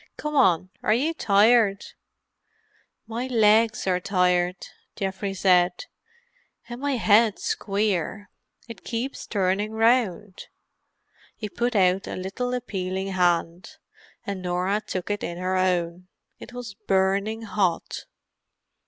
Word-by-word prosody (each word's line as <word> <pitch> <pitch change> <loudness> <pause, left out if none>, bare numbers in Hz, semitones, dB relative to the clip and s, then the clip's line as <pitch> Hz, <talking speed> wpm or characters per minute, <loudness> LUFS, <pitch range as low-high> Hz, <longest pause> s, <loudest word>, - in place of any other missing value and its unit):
"Come 300 0 -4
on—are 185 - +2
you 300 +7 0
tired?" 210 -4 +3 1.2
"My 235 +3 -4
legs 220 -2 +3
are 180 -1 +1
tired," 180 -1 +1 0.4
Geoffrey 195 0 -3
said. 180 - +2 0.8
"And 240 +1 -8
my 285 0 0
head's 220 -2 +3
queer. 200 -1 -2 0.4
It 230 -5 -10
keeps 245 +4 -4
turning 200 +1 0
round." 220 -4 +1 0.9
He 210 - -6
put 240 +3 -2
out 190 -1 +2
a - - -5
little 220 +7 -3
appealing 190 -5 -3
hand, 180 - 0 0.5
and 200 -3 -4
Norah 180 +3 -1
took 190 -2 -4
it 205 - -2
in 170 - -4
her 185 +1 -1
own. 180 -1 0 0.3
It - - -11
was 245 -4 -7
burning 195 +4 +1
hot. 190 -4 -2
200 Hz, 115 wpm, -25 LUFS, 185-225 Hz, 1.2 s, tired